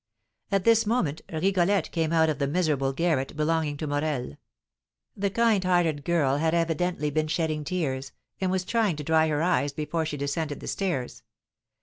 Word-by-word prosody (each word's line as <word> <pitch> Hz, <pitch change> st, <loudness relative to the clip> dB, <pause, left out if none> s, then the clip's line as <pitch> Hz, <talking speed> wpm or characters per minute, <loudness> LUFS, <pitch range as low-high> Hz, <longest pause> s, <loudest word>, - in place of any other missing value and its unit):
At 195 Hz, -2 st, +2 dB
this 225 Hz, 0 st, +4 dB
moment 195 Hz, -, 0 dB
Rigolette 185 Hz, +2 st, +1 dB
came 165 Hz, -2 st, 0 dB
out 160 Hz, -1 st, +4 dB
of 155 Hz, -2 st, -1 dB
the 140 Hz, -, +1 dB
miserable 145 Hz, -4 st, +1 dB
garret 150 Hz, -2 st, -1 dB
belonging 155 Hz, -1 st, 0 dB
to 155 Hz, -, -4 dB
Morel; 145 Hz, -, -2 dB, 0.8 s
the 200 Hz, 0 st, 0 dB
kind 225 Hz, -2 st, +2 dB
hearted 175 Hz, -5 st, +1 dB
girl 145 Hz, -5 st, +2 dB
had 160 Hz, +2 st, +1 dB
evidently 165 Hz, -2 st, 0 dB
been 155 Hz, +1 st, 0 dB
shedding 155 Hz, -1 st, -1 dB
tears, 140 Hz, -6 st, -2 dB, 0.3 s
and 190 Hz, -, 0 dB
was 185 Hz, 0 st, -1 dB
trying 220 Hz, -5 st, +1 dB
to 150 Hz, -, -6 dB
dry 160 Hz, +1 st, +3 dB
her 150 Hz, 0 st, 0 dB
eyes 170 Hz, -5 st, +1 dB
before 155 Hz, +2 st, -2 dB
she 150 Hz, -, -4 dB
descended 145 Hz, +1 st, -2 dB
the -, -, -9 dB
stairs. 170 Hz, -11 st, -2 dB
160 Hz, 170 wpm, -26 LUFS, 145-180 Hz, 0.8 s, this